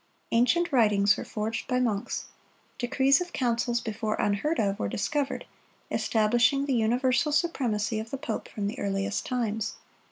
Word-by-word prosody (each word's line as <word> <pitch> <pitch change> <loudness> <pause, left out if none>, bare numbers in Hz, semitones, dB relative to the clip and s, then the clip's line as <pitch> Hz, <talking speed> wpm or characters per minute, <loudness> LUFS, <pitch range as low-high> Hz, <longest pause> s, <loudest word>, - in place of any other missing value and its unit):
Ancient 255 +10 +3
writings 210 -5 +4
were - - -5
forged 220 +1 -4
by 250 -1 +1
monks. 220 -5 -1 0.5
Decrees 270 +4 +3
of 355 0 -5
councils 240 -1 0
before 220 -1 -2
unheard 210 +11 0
of, 200 -2 0
were 100 - -1
discovered, 270 - -2 0.5
establishing 235 +5 +2
the 280 - 0
universal 250 +5 +2
supremacy 235 - 0
of 220 +1 -6
the 275 - -4
pope 305 +3 -4
from 205 - -4
the 215 +6 -3
earliest 195 +1 -2
times. 225 -3 -2
230 Hz, 150 wpm, -27 LUFS, 210-265 Hz, 0.5 s, writings